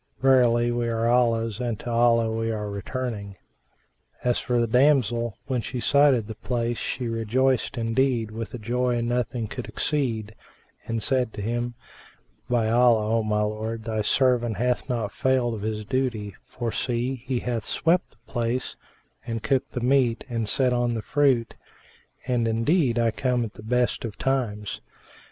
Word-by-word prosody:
Verily 120 -3 +4
we 120 0 -1
are 115 0 0
Allah's 115 -2 +2
and 120 -4 -2
to 120 - -5
Allah 115 -1 +3
we 115 0 -1
are 105 -2 -3
returning!" 100 -1 -4 0.9
As 125 -1 +2
for 125 -1 0
the 120 - +3
damsel, 120 -3 +2
when 130 -3 -1
she 125 - -5
sighted 140 -3 +4
the 110 - -6
place 120 +1 -2
she 125 -2 -3
rejoiced 120 +4 0
indeed 115 -1 +1
with 115 0 -5
a - - -4
joy 120 +2 0
nothing 120 -1 -1
could 125 +3 -6
exceed, 115 -8 -1 0.5
and 115 -1 -2
said 125 -4 +1
to 100 - -5
him, 120 +2 -2 0.7
"By 120 -3 +2
Allah, 115 -1 +4
O - - +2
my 105 -1 0
lord, 110 +1 -3
thy 110 -1 -2
servant 120 -1 +2
hath 125 +3 0
not 115 -4 -1
failed 130 -3 +1
of 110 - -5
his 105 0 -3
duty; 115 -5 -1
for 120 -2 -4
see, 125 +2 -2
he 125 -2 -1
hath 120 -4 -2
swept 175 +2 +1
the - - -27
place 120 +1 -2 0.5
and 115 -2 -3
cooked 135 -2 0
the 125 - -3
meat 125 -2 +2
and 115 -4 -2
set 130 +1 +3
on 120 -1 +1
the 110 - -4
fruit; 135 -6 +2 0.7
and 120 -2 +1
indeed 120 +3 +2
I 115 -1 +3
come 125 +1 0
at 110 - -9
the - - -12
best 125 +3 0
of 110 -4 -5
times." 115 -6 -2
120 Hz, 165 wpm, -25 LUFS, 115-125 Hz, 0.9 s, Verily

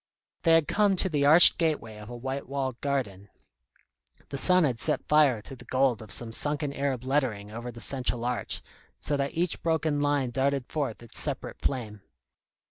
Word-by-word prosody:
They 165 - +3
had 165 -3 +3
come 205 -2 +2
to 190 +1 +1
the 145 -3 +1
arched 165 +4 +8
gateway 150 -10 -2
of 105 +1 -11
a 120 - -8
white 130 +2 -6
walled 135 -3 -4
garden. 105 -9 -3 1.0
The 140 - -5
sun 185 +2 +6
had 125 -6 -1
set - - 0
fire 145 -8 +3
to 135 - -9
the 125 0 -14
gold 130 -3 0
of 110 -3 -11
some 115 +4 +2
sunken 145 +3 -1
Arab 135 -3 -3
lettering 130 -7 -2
over 120 +2 -7
the 120 0 -12
central 125 -3 -1
arch, 125 0 -3 0.4
so 145 - -2
that 140 0 -3
each 175 0 -2
broken 160 -2 -1
line 145 -3 0
darted 135 +1 -1
forth 135 -7 -4
its 115 - -2
separate - - -2
flame. 110 -6 -4
135 Hz, 185 wpm, -27 LUFS, 120-145 Hz, 1.0 s, arched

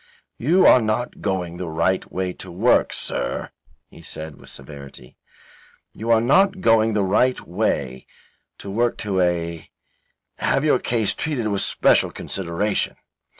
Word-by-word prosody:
"You 170 +10 +3
are 125 - +7
not 110 +2 -2
going 90 -3 -2
the 90 -2 -5
right 85 +4 -1
way 90 -1 -2
to 95 - -10
work, 105 +8 +2
Sir," - - -3 0.4
he - - -14
said, 80 -1 -7
with - - -14
severity. 70 -2 -11 0.8
"You 115 +2 -6
are 115 -1 +5
not 190 - +3
going 115 -6 +3
the 105 -1 +1
right 110 +7 +2
way 75 - -2 0.5
to 100 - -8
work 120 +3 0
to 95 -3 0
a 85 -2 -2 0.7
have 135 +2 +1
your 145 -4 +3
case 115 -4 0
treated 130 -9 -2
with 100 -1 0
special - - +3
consideration. 95 +3 -2
100 Hz, 145 wpm, -22 LUFS, 85-115 Hz, 0.8 s, are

